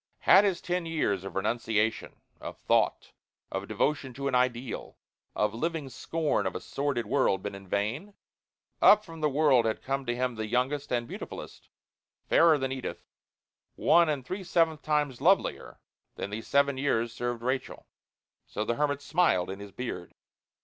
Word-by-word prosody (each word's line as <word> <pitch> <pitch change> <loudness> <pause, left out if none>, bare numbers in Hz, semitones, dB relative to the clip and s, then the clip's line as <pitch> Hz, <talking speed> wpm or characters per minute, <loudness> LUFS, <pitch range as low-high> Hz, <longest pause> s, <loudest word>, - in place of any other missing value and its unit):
Had 195 +3 +7
his 190 -3 0
ten 180 -1 -2
years 105 - 0
of 95 -2 -8
renunciation, 110 +1 -1 0.2
of - - -8
thought, - - +1 0.4
of - - -4
devotion 140 -4 -1
to 140 +1 -3
an 135 - -2
ideal, 125 -1 -1 0.4
of 105 0 +1
living 155 +3 -3
scorn 145 -4 -1
of 95 - -4
a - - -2
sordid 140 -4 -2
world, 95 -9 +1
been 105 - -4
in 100 -1 -10
vain? 115 - -2 0.7
Up 210 0 +7
from 165 -2 -10
the 150 - +2
world 140 -4 +4
had 110 - -2
come 135 -1 -2
to 120 - 0
him 125 0 -1
the 110 -1 -4
youngest 130 +5 -1
and 120 -1 0
beautifulest - - -9 0.6
fairer 165 -2 +5
than 135 -1 -2
Edith 130 -1 -5 0.7
one 170 -1 +4
and 140 -4 -2
three 190 +7 -5
seventh 165 -3 +1
times 150 -4 -1
lovelier 190 +6 +1 0.4
than 100 - -5
the 110 +2 -4
seven 140 +1 +1
years 120 -5 0
served 120 0 -3
Rachel. 130 +1 -3 0.6
So 105 - -3
the 120 - 0
hermit 145 -1 0
smiled 145 - +2
in 95 - -7
his 100 0 -9
beard. 100 -5 -6
130 Hz, 165 wpm, -28 LUFS, 115-150 Hz, 0.7 s, Had